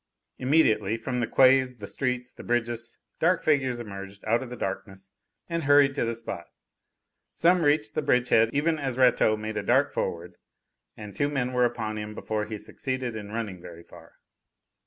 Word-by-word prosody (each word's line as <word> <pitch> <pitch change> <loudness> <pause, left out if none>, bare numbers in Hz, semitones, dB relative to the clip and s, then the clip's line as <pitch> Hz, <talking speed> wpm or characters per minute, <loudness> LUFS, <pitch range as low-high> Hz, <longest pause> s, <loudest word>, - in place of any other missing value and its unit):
Immediately, 115 -7 +2
from 125 +2 -3
the 115 - 0
quays, 130 0 +4
the 105 - -8
streets, 125 +2 -3
the - - -11
bridges, 120 -1 -2 0.2
dark 175 +2 +2
figures 130 -5 +1
emerged 100 -3 -9
out 115 +3 +2
of 130 - -7
the 125 - -6
darkness 95 -1 -6 0.4
and 170 -3 -3
hurried 145 -1 +5
to 135 - -1
the 115 0 -2
spot. 115 -7 -7 0.9
Some 175 +1 +3
reached 145 -8 +2
the - - 0
bridgehead 125 -2 +3
even 155 +3 +1
as 135 -3 -3
Rateau 125 -4 +4
made 110 0 -5
a - - 0
dart 140 +3 +2
forward, 85 0 -4 0.6
and 105 -2 -9
two 145 0 +1
men 130 -3 -2
were 125 0 +3
upon 110 -3 -3
him 105 0 -6
before 105 -1 -3
he 110 0 -6
succeeded 130 +1 -4
in 105 -1 -7
running 105 -5 -4
very 85 -1 -11
far. - - -16
120 Hz, 180 wpm, -26 LUFS, 105-130 Hz, 0.9 s, hurried